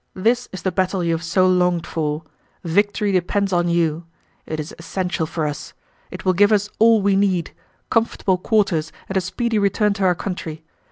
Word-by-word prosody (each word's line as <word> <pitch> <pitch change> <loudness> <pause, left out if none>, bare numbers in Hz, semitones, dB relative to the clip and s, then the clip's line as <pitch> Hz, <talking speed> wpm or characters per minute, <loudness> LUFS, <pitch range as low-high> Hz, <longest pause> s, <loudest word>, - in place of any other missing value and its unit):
This 235 +6 +1
is 190 - -8
the 185 - 0
battle 185 0 0
you 170 - +1
have 165 - -2
so 180 +3 +2
longed 180 -2 +2
for. 155 -1 -2 0.4
Victory 205 +4 +1
depends 195 +2 0
on 175 0 +2
you. 170 -1 0 0.4
It 155 - -4
is 155 +1 -6
essential 175 -1 -2
for 160 -1 -2
us; 150 -1 -5 0.3
it - - -9
will 185 - +4
give 205 +4 +4
us 205 0 +2
all 225 -2 +5
we 200 -1 +3
need: 190 -4 +1 0.4
comfortable 215 -5 +1
quarters 185 -7 +1 0.2
and 190 - -4
a 190 - +3
speedy 215 +5 -1
return 205 +1 +2
to 200 -1 -3
our 180 -1 +3
country. 165 -4 -5
185 Hz, 185 wpm, -21 LUFS, 170-200 Hz, 0.4 s, all